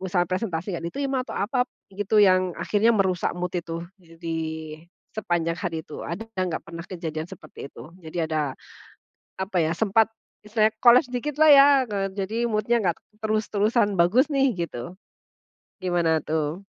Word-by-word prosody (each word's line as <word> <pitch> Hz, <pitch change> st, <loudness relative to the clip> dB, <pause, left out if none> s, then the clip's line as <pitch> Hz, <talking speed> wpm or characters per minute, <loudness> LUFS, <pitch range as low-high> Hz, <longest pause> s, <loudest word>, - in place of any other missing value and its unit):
misalnya 180 Hz, -2 st, 0 dB
presentasi 185 Hz, -3 st, -2 dB
gak -, -, -9 dB
diterima 275 Hz, +4 st, -2 dB
atau -, -, -7 dB
apa 245 Hz, +5 st, 0 dB, 0.2 s
gitu 205 Hz, +2 st, -1 dB
yang 185 Hz, -2 st, +3 dB
akhirnya 210 Hz, +2 st, +1 dB
merusak 190 Hz, -5 st, 0 dB
mood 180 Hz, 0 st, -3 dB
itu, 170 Hz, -1 st, -4 dB, 0.2 s
eee, 165 Hz, -2 st, -18 dB
di 165 Hz, -1 st, -3 dB, 0.8 s
sepanjang 170 Hz, -5 st, -1 dB
hari 165 Hz, -5 st, -3 dB
itu, 150 Hz, -, -9 dB
ada 175 Hz, +7 st, -5 dB, 0.2 s
nggak 180 Hz, -3 st, -2 dB
pernah 170 Hz, 0 st, -8 dB
kejadian 160 Hz, -3 st, -5 dB
seperti 175 Hz, -6 st, -10 dB
itu? 155 Hz, -, -12 dB
Jadi 165 Hz, 0 st, -3 dB
ada 155 Hz, -4 st, -2 dB, 0.8 s
apa 190 Hz, 0 st, -3 dB
ya, 160 Hz, -2 st, +2 dB
sempat 220 Hz, +4 st, +2 dB, 0.3 s
misalnya 215 Hz, 0 st, +3 dB, 0.2 s
koles 245 Hz, +1 st, +7 dB
dikit 270 Hz, +4 st, -3 dB
lah 310 Hz, -, +7 dB
ya, 280 Hz, 0 st, +9 dB, 0.2 s
eee, 195 Hz, -1 st, -1 dB
jadi 200 Hz, +2 st, -3 dB
mood-nya 220 Hz, +2 st, +1 dB
nggak 175 Hz, -3 st, +1 dB, 0.3 s
terus-terusan 215 Hz, 0 st, +1 dB
bagus 225 Hz, -, +4 dB
nih 275 Hz, -2 st, +3 dB
gitu, 170 Hz, -5 st, -5 dB, 0.9 s
gimana 170 Hz, -3 st, +2 dB
tuh? 155 Hz, +4 st, -2 dB
185 Hz, 155 wpm, -25 LUFS, 170-220 Hz, 0.9 s, ya